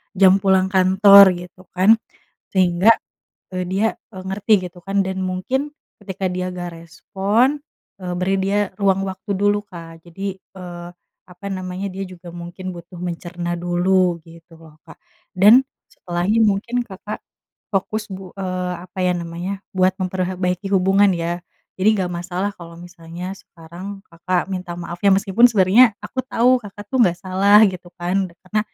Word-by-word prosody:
jam 190 0 +5
pulang 190 -1 +3
kantor, 190 +1 +7
gitu 180 +1 -12
kan. 190 +5 +5 0.5
Sehingga, 185 +3 +4 0.6
eee, 185 -1 -3
dia, 195 +5 +1 0.3
eee, 185 - -7
ngerti 190 0 +1
gitu 175 - -17
kan, 195 0 +1
dan 190 0 -4
mungkin, 220 +11 -2 0.2
ketika 190 -2 -4
dia 180 0 -3
nggak 175 -1 -5
respon, 195 - 0 0.4
eee, 180 -1 -5
beri 185 +2 0
dia, 195 +2 0 0.2
ruang 195 -1 +2
waktu 190 +1 -4
dulu, 205 +1 +1
Kak. 165 -3 -11
Jadi, 190 +3 -6
eee, 175 -2 -10 0.4
apa 180 +2 -12
namanya, 185 +1 -4
dia 195 +1 -5
juga 180 -1 -11
mungkin 175 +2 -7
butuh 175 0 -10
mencerna 175 0 -4
dulu, 175 0 +1
gitu 165 +1 -17
loh 160 -1 -17
Kak. - - -12 0.4
Dan, 215 +8 +6 0.2
setelahnya 175 +5 -1
mungkin 235 +4 -1
Kakak, 200 +2 -7 0.6
fokus 210 +2 -1
bu 190 -2 -9
eee, 185 -1 -3
apa 190 +1 -14
ya 180 - +2
namanya, 175 +3 -5 0.2
buat 185 0 +4
memperhe 185 0 -2
baiki 180 +1 -2
hubungan 195 +1 +4
ya. 175 0 -2 0.3
Jadi 190 +3 +2
nggak 185 - -1
masalah 180 +3 -3
kalau 170 -1 -11
misalnya 175 +1 -8
sekarang, 180 +5 -10
Kakak 175 +2 -1
minta 180 -2 -4
maaf 170 0 -6
ya, 200 - +5
meskipun 200 +3 +2
sebenernya, 220 +4 +5
aku 215 +5 -4
tahu 255 0 +3
Kakak 205 0 -10
tuh 260 - 0
nggak 175 -5 +2
salah, 195 +2 +4
gitu 180 -1 -10
kan. 185 +2 0
Karena, 185 +5 -3
185 Hz, 155 wpm, -20 LUFS, 175-195 Hz, 0.6 s, kantor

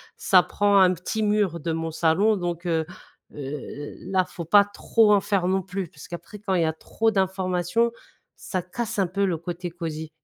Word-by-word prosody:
ça 185 -2 +4
prend 205 -1 +2
un 185 -1 +6
petit 185 +5 -3
mur 205 -5 +1
de 165 +2 -3
mon 165 0 -2
salon 185 +7 +2
donc, 175 -1 -4
heu 160 -2 +1 0.5
heu - - -13
heu, 145 +1 -6 0.2
là 185 -1 +3
faut 175 -2 -8
pas 200 +5 +6
trop 210 +2 +2
en 200 - +4
faire 195 -3 0
non 190 0 +1
plus, 190 0 -4
parce 150 -6 -13
qu'après 175 +4 -8
quand 195 -2 -3
il 180 - +2
y - - +3
a 160 - 0
trop 225 +7 -1
d'informations, 190 +2 0 0.4
ça 185 -3 -4
casse 205 +4 -4
un 190 - +2
peu 200 +3 0
le 175 -4 0
côté 175 +1 -5
cosy. 160 -2 -5
180 Hz, 205 wpm, -25 LUFS, 170-200 Hz, 0.5 s, un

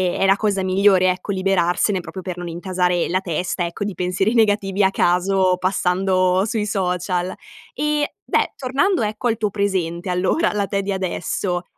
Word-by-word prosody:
è - - +1
la 195 +1 +4
cosa 200 -3 0
migliore 185 0 +4
ecco 185 +2 -2
liberarsene, 185 0 +1
proprio 185 +1 -8
per 180 -2 -5
non 175 0 -6
intasare 180 0 -1
la 185 - +1
testa, 180 0 -2
ecco, 170 +4 -5
di 205 -1 -3
pensieri 180 +5 0
negativi 205 -3 +2
a 190 - +5
caso 185 +1 +2
passando 185 0 +1
sui 220 -1 -1
social. 180 -2 -1 0.4
E, 300 0 -1
beh, - - 0
tornando 280 +9 0
ecco 215 +2 -2
al 230 - +1
tuo 210 -2 -1
presente, 190 -3 -2
allora 180 - +1
alla 205 -1 -1
te 200 0 -1
di 195 0 -2
adesso, 180 -1 -2
190 Hz, 170 wpm, -21 LUFS, 180-205 Hz, 0.4 s, a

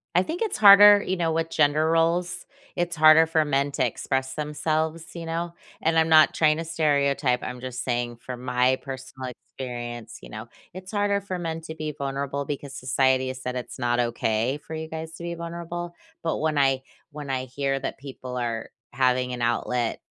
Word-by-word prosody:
I 180 - +5
think 325 - -5
it's 445 -3 -1
harder, 205 0 +9
you 185 - -1
know, 170 -3 0
with 165 0 -1
gender 150 +1 +3
roles. 170 +2 +1 0.3
It's 175 0 -1
harder 155 +1 +7
for 160 -1 +2
men 140 0 +1
to 130 - +1
express 130 +2 -2
themselves, 155 +2 -2
you 170 -1 -6
know, 170 +1 -3 0.3
and 165 0 +3
I'm 160 0 +2
not 155 -1 +6
trying 155 -1 +3
to 165 - -4
stereotype, 140 -5 +1
I'm 125 0 -5
just 130 0 -5
saying 120 -1 -2
from 125 +1 -8
my 125 +1 +2
personal 130 -1 -7
experience, 120 -2 -7
you - - -12
know, 110 +2 -8 0.3
it's 185 +1 -9
harder 205 -1 +1
for 190 -2 -4
men 165 -2 -3
to 160 0 -8
be 155 -1 -4
vulnerable 140 0 -3
because 140 -1 -5
society 130 +1 +1
has 130 0 -5
said 125 0 -4
it's 125 - -7
not 120 0 0
okay 120 +1 0
for - - -8
you 160 0 -4
guys 160 0 -6
to - - -9
be 170 0 -4
vulnerable, 170 +1 -6 0.3
but 165 - 0
when 155 -1 0
I 135 -2 +3 0.3
when 145 -1 -8
I 130 -1 -1
hear 135 +2 -2
that 135 - -4
people 130 -2 -7
are 115 -2 -3 0.2
having 125 0 +1
an 120 - -5
outlet, 120 0 0
145 Hz, 195 wpm, -25 LUFS, 130-165 Hz, 0.3 s, harder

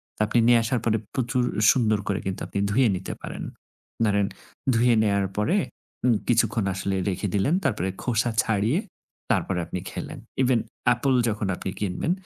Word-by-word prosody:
তা - - -5
আপনি 120 - +2
নিয়ে 120 -1 +6
আসার 120 +2 0
পরে 110 -1 +2 0.2
প্রচুর 125 -1 0 0.3
সুন্দর 110 -5 +2
করে 100 -1 0
কিন্তু 95 -1 -3
আপনি 100 - -3
ধুয়ে 125 +2 +4
নিতে 95 - -5
পারেন। - - -6 0.6
ধরেন 100 -1 +2 0.5
ধুয়ে 120 +1 +4
নেয়ার 100 -2 +2
পরে 160 - +2 0.5
উম 120 - +4
কিছুক্ষণ 115 -3 +2
আসলে 95 +1 -2
রেখে 95 +2 -2
দিলেন, 120 +11 +2
তারপরে 95 -5 0
খোসা 120 -1 +1
ছাড়িয়ে 110 - +1 0.5
তারপরে 90 -2 +1
আপনি 90 - -4
খেলেন। - - -6 0.2
Even 125 -2 +3 0.3
অ্যাপল 125 +3 +3 0.2
যখন 105 -2 -2
আপনি 95 - -5
কিনবেন 105 - -1
110 Hz, 160 wpm, -25 LUFS, 100-120 Hz, 0.6 s, নিয়ে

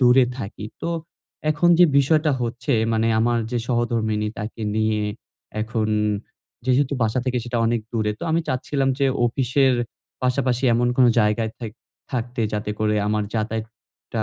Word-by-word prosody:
দূরে 125 +1 +6
থাকি। 105 -2 -6 0.2
তো 165 - -1 0.6
এখন 155 +3 +2
যে 180 - +9
বিষয়টা 155 +2 +3
হচ্ছে 120 +4 -2 0.2
মানে 110 +1 +2
আমার 120 +1 +2
যে 120 - 0
সহধর্মিণী 115 -3 0
তাকে 110 +1 -5
নিয়ে 110 -1 +1 0.6
এখন 110 0 -1 0.8
যেহেতু 130 +2 +2
বাসা 110 +2 +1
থেকে 125 -1 0
সেটা 120 -1 -2
অনেক 115 0 +1
দূরে। 110 -2 0
তো - - -11
আমি 165 +1 +2
চাচ্ছিলাম 135 +1 0
যে 140 - +3 0.2
অফিসের 130 +1 +2 0.5
পাশাপাশি 125 0 +1
এমন 120 +1 +2
কোনো 125 -2 +6
জায়গায় 105 +1 +1
থাক 115 -4 -5 0.4
থাকতে 120 0 -3
যাতে 105 0 -2
করে 105 0 +1
আমার 105 0 +1
যাতায়াতটা 110 0 -4
120 Hz, 150 wpm, -23 LUFS, 110-130 Hz, 0.8 s, যে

